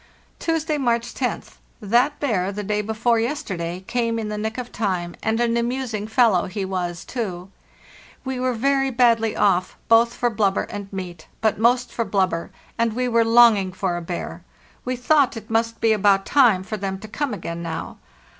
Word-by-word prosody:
"Tuesday, 320 Hz, -2 st, -1 dB
March 235 Hz, -2 st, 0 dB
1oth. 250 Hz, -2 st, -4 dB, 0.2 s
That 245 Hz, +7 st, +2 dB
bear 200 Hz, -9 st, 0 dB
the 205 Hz, +1 st, -5 dB
day 210 Hz, +1 st, 0 dB
before 220 Hz, +2 st, +1 dB
yesterday 190 Hz, -, -3 dB
came 230 Hz, 0 st, -1 dB
in 220 Hz, -2 st, -3 dB
the 210 Hz, -, -3 dB
nick 220 Hz, +2 st, -3 dB
of 245 Hz, -1 st, -5 dB
time, 180 Hz, -5 st, -2 dB
and 220 Hz, +1 st, 0 dB
an 235 Hz, -1 st, +1 dB
amusing 235 Hz, -3 st, -2 dB
fellow 220 Hz, -6 st, +3 dB
he 195 Hz, +1 st, -4 dB
was, 175 Hz, -2 st, -3 dB
too. 190 Hz, -6 st, -5 dB, 0.7 s
We 260 Hz, -1 st, -3 dB
were 255 Hz, -1 st, 0 dB
very 270 Hz, +3 st, +1 dB
badly 230 Hz, -3 st, +3 dB
off 185 Hz, -3 st, +1 dB
both 230 Hz, +1 st, +5 dB
for 240 Hz, -1 st, 0 dB
blubber 200 Hz, -3 st, +1 dB
and 200 Hz, -1 st, -7 dB
meat, 180 Hz, -4 st, -7 dB
but 220 Hz, -2 st, +1 dB
most 245 Hz, +2 st, +2 dB
for 230 Hz, -, 0 dB
blubber, 190 Hz, -5 st, 0 dB, 0.3 s
and 230 Hz, -1 st, +1 dB
we 250 Hz, +2 st, -1 dB
were 230 Hz, -1 st, +3 dB
longing 225 Hz, -5 st, +5 dB
for 185 Hz, -2 st, -1 dB
a 175 Hz, -, -3 dB
bear; 175 Hz, +1 st, -6 dB, 0.4 s
we 255 Hz, +1 st, -1 dB
thought 265 Hz, 0 st, +2 dB
it 220 Hz, 0 st, -10 dB
must 230 Hz, 0 st, 0 dB
be 225 Hz, -1 st, +3 dB
about 200 Hz, -2 st, +3 dB
time 235 Hz, -10 st, +4 dB
for 215 Hz, +3 st, -5 dB
them 195 Hz, -1 st, -3 dB
to 215 Hz, +3 st, -10 dB
come 280 Hz, +5 st, -3 dB
again 170 Hz, -5 st, -5 dB
now. 165 Hz, -1 st, -5 dB
225 Hz, 185 wpm, -22 LUFS, 195-240 Hz, 0.7 s, both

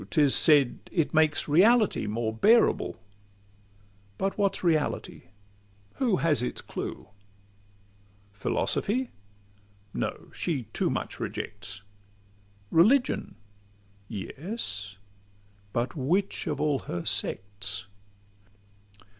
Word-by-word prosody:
'Tis 145 Hz, -3 st, +4 dB
said 145 Hz, -5 st, +5 dB
it 165 Hz, -5 st, 0 dB
makes 155 Hz, -1 st, +3 dB
reality 200 Hz, -, +4 dB
more 110 Hz, +1 st, -2 dB
bearable: 225 Hz, -, +3 dB, 1.2 s
But 195 Hz, 0 st, -1 dB
what 200 Hz, -2 st, +1 dB
's -, -, -5 dB
reality? 160 Hz, -4 st, 0 dB, 0.7 s
Who 240 Hz, -7 st, +2 dB
has 165 Hz, -6 st, +2 dB
its 125 Hz, -, -3 dB
clue? -, -, -6 dB, 1.2 s
Philosophy? 220 Hz, -, 0 dB, 0.8 s
No: -, -, -4 dB
she 150 Hz, -8 st, -1 dB
too -, -, 0 dB
much -, -, -4 dB
rejects. 100 Hz, +1 st, -5 dB, 0.9 s
Religion? 245 Hz, +11 st, +3 dB, 0.7 s
Yes; 105 Hz, -, -5 dB, 0.7 s
but 120 Hz, +3 st, -2 dB
which 175 Hz, +9 st, 0 dB
of 150 Hz, -3 st, -2 dB
all 150 Hz, -2 st, +1 dB
her 85 Hz, -1 st, -3 dB
sects? 100 Hz, +2 st, -1 dB
150 Hz, 90 wpm, -27 LUFS, -, 1.2 s, said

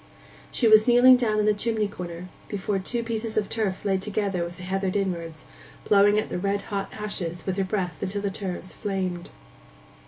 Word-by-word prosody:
She 235 Hz, -, +2 dB
was 215 Hz, +1 st, +7 dB
kneeling 245 Hz, +1 st, +8 dB
down 230 Hz, -4 st, +1 dB
in 210 Hz, -, +2 dB
the 210 Hz, -, +4 dB
chimney 215 Hz, 0 st, 0 dB
corner, 180 Hz, -2 st, -7 dB, 0.2 s
before 200 Hz, -1 st, -2 dB
two 235 Hz, +5 st, -2 dB
pieces 225 Hz, -1 st, -3 dB
of 210 Hz, -2 st, +1 dB
turf 210 Hz, -4 st, -2 dB
laid 190 Hz, -2 st, +1 dB
together 200 Hz, -3 st, -1 dB
with 170 Hz, 0 st, -7 dB
the 180 Hz, -, -9 dB
heather 190 Hz, +1 st, -1 dB
inwards, 170 Hz, -5 st, -3 dB, 0.4 s
blowing 205 Hz, 0 st, +5 dB
at 215 Hz, -, 0 dB
the -, -, -3 dB
red 200 Hz, +1 st, -1 dB
hot 195 Hz, -1 st, -2 dB
ashes 175 Hz, -5 st, -5 dB
with 190 Hz, -, -1 dB
her 195 Hz, -, +2 dB
breath 185 Hz, -4 st, -3 dB
till 205 Hz, +1 st, -3 dB
the 200 Hz, -, -1 dB
turves 185 Hz, -2 st, -5 dB
flamed. 185 Hz, -3 st, -3 dB
200 Hz, 190 wpm, -25 LUFS, 185-215 Hz, 0.4 s, kneeling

